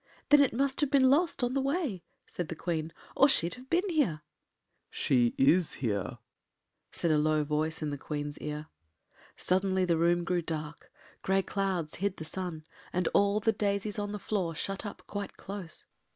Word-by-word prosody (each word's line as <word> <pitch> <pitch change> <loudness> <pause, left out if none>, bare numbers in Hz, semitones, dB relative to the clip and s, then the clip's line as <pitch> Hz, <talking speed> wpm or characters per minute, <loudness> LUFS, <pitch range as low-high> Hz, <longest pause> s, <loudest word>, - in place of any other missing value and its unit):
“Then 290 0 +8
it 280 - +4
must 270 +3 0
have 290 - +2
been 265 -2 +5
lost 320 -2 +2
on 245 +1 +1
the 275 - +1
way,” 275 - -1 0.2
said 175 - -5
the 165 - -5
Queen, 160 -1 -2 0.2
“or 275 - +6
she’d 170 -9 +3
have 255 +1 -13
been 355 +4 +2
here——” 260 - +1 0.7
“She 120 -3 +2
is 165 +5 +4
here,” 100 -7 -2 0.7
said 170 - 0
a 150 - +4
low 155 0 +2
voice 155 +2 -1
in 150 - -1
the 145 - -4
Queen’s 145 0 -4
ear. 150 0 -4 0.7
Suddenly 190 0 +1
the 170 -2 +2
room 175 +1 +3
grew 175 0 0
dark, 155 -2 -6 0.3
grey 195 0 +2
clouds 190 -6 -2
hid 200 -1 0
the 160 - -6
sun, 170 -2 -4 0.3
and 180 -1 +1
all 200 +1 +4
the 225 +1 +3
daisies 205 0 -1
on 205 0 -2
the 210 - -3
floor 190 -5 -2
shut 195 +5 -3
up - - -9
quite 205 -1 -5
close. 195 -5 -6
185 Hz, 180 wpm, -30 LUFS, 155-210 Hz, 0.7 s, Then